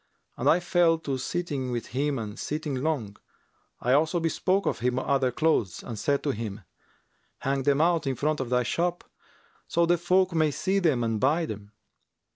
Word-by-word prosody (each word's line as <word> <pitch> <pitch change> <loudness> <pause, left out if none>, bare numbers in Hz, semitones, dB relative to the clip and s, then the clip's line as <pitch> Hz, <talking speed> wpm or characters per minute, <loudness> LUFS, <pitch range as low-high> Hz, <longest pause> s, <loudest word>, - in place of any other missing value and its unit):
And - - +1
I 170 - +5
fell 175 -2 +3
to 140 -5 -3
sitting 145 -4 -3
with 120 -2 -4
him 140 +2 -1
and 105 -2 -6
sitting 150 -1 -3
long: 130 -7 -2 0.6
I 125 - +1
also 155 +4 +3
bespoke 185 +4 0
of - - -1
him 125 +2 0
other 130 -1 +1
clothes 140 - 0
and 115 -3 -6
said 140 +5 0
to 145 - +1
him, 110 -3 -5 0.8
'Hang 135 0 0
them 140 +2 +2
out 165 -3 +2
in 135 - 0
front 150 +4 0
of 130 -3 -3
thy 125 0 +2
shop, 175 +7 -1 0.6
so 170 0 +2
the 175 0 +2
folk 185 +1 +2
may 155 -2 +3
see 190 +7 0
them 150 -10 +2
and 115 -1 0
buy 155 +7 +2
them.' 105 -5 -8
145 Hz, 185 wpm, -27 LUFS, 125-165 Hz, 0.8 s, I